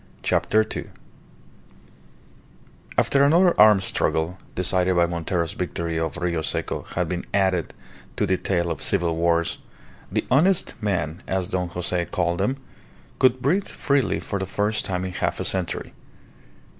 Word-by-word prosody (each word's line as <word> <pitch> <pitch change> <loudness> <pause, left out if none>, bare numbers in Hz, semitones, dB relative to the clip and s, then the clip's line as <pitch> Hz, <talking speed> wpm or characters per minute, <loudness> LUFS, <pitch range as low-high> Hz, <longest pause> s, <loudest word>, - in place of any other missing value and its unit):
CHAPTER 110 +1 +2
TWO 110 - -6 2.1
After 140 0 +3
another 170 +5 +5
armed 105 -2 +7
struggle, 85 +1 0 0.2
decided 90 0 +1
by 85 0 +4
Montero's 85 0 -2
victory 85 -2 -3
of 80 +1 -2
Rio 85 -2 -1
Seco, 75 - -3
had 90 -1 0
been 90 +1 -3
added 95 -3 +1 0.4
to - - +1
the 95 - +2
tale 85 -3 -1
of - - -4
civil 85 -4 +2
wars, 85 0 +1 0.5
the - - -1
"honest 175 +8 +3
men," 85 -5 -2
as 95 -1 -1
Don 90 -3 -1
Jose 90 0 -1
called 85 -1 -1
them, 135 +1 0 0.6
could 130 -1 +3
breathe 185 +9 +1
freely 140 -2 0
for 100 - -4
the 95 - -3
first 105 +3 0
time 90 -1 -2
in 95 - -4
half - - -2
a - - -2
century. 95 -3 -1
90 Hz, 145 wpm, -24 LUFS, 85-105 Hz, 2.1 s, armed